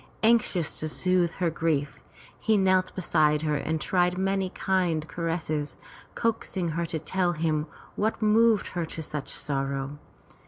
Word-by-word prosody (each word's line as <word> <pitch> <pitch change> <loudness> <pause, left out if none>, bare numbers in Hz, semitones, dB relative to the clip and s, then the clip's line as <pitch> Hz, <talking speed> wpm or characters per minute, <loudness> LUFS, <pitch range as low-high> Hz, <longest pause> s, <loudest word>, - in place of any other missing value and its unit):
Anxious 220 -8 +2
to 155 - -2
soothe 180 +1 +1
her 175 -2 0
grief, 155 -3 -1 0.4
he 220 -1 +2
knelt 185 -1 +3
beside 155 -4 +2
her 155 -1 +1
and 160 +2 -1
tried 180 +1 +1
many 195 0 +1
a - - -7
kind 180 -5 0
caress, 160 -4 -2 0.4
coaxing 210 -6 -1
her 170 +2 -2
to 165 -1 -2
tell 175 +3 0
him 155 -1 0 0.3
what 215 +2 0
moved 220 0 +4
her 175 -2 -2
to 160 - -6
such 150 -1 -5
sorrow. 135 0 -3
170 Hz, 150 wpm, -27 LUFS, 155-190 Hz, 0.4 s, moved